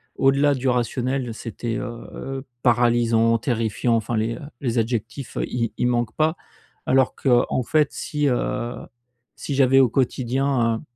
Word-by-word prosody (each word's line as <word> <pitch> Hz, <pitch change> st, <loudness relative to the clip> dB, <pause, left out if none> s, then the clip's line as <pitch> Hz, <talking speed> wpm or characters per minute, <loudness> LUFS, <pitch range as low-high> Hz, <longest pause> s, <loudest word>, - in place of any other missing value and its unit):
au-delà 140 Hz, +2 st, +3 dB
du 135 Hz, -1 st, -2 dB
rationnel, 125 Hz, 0 st, -1 dB
c'était, 115 Hz, +1 st, -5 dB
heu 120 Hz, -2 st, -6 dB
heu, 135 Hz, 0 st, -6 dB, 0.2 s
paralysant, 115 Hz, -2 st, +3 dB
terrifiant, 115 Hz, -1 st, 0 dB
enfin 115 Hz, +1 st, -1 dB
les, 115 Hz, +2 st, -1 dB
heu, -, -, -10 dB, 0.2 s
les 125 Hz, -3 st, -1 dB
adjectifs, 115 Hz, +3 st, -2 dB
i 115 Hz, -3 st, -2 dB
ils 120 Hz, -, +1 dB
manquent 120 Hz, -2 st, 0 dB
pas. 160 Hz, +1 st, +2 dB, 0.5 s
Alors 130 Hz, 0 st, +2 dB
qu'en 125 Hz, -1 st, +2 dB
fait, 150 Hz, +4 st, +2 dB
si, 150 Hz, -1 st, -2 dB
heu, 120 Hz, -1 st, -1 dB, 0.6 s
si 140 Hz, -, -4 dB
j'avais 135 Hz, -1 st, +5 dB
au 130 Hz, -2 st, +5 dB
quotidien, 130 Hz, -1 st, +1 dB
heu, -, -, -12 dB
125 Hz, 150 wpm, -23 LUFS, 115-135 Hz, 0.6 s, j'avais